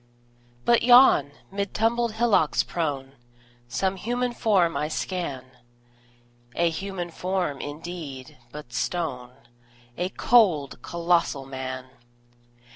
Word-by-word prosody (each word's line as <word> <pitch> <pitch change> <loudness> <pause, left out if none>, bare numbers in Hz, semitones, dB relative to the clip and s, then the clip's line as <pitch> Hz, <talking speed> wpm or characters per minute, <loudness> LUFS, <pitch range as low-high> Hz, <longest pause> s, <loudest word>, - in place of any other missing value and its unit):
But 235 - +4
yon, 240 - +6 0.2
mid 200 0 -3
tumbled 230 +1 +1
hillocks 220 -9 +2
prone, 140 -5 -3 0.6
Some 190 +10 -1
human 245 +4 -2
form 185 -8 +2
I 150 - -1
scan 155 -5 -4 1.1
A 170 0 +2
human 180 0 -5
form, 180 -5 -2
indeed, 145 -3 -7 0.2
but 150 -5 -10
stone: 125 -3 -3 0.7
A 180 +1 0
cold, 180 - +3
colossal 170 -4 0
Man! 130 -1 -6
170 Hz, 100 wpm, -25 LUFS, 140-200 Hz, 1.1 s, yon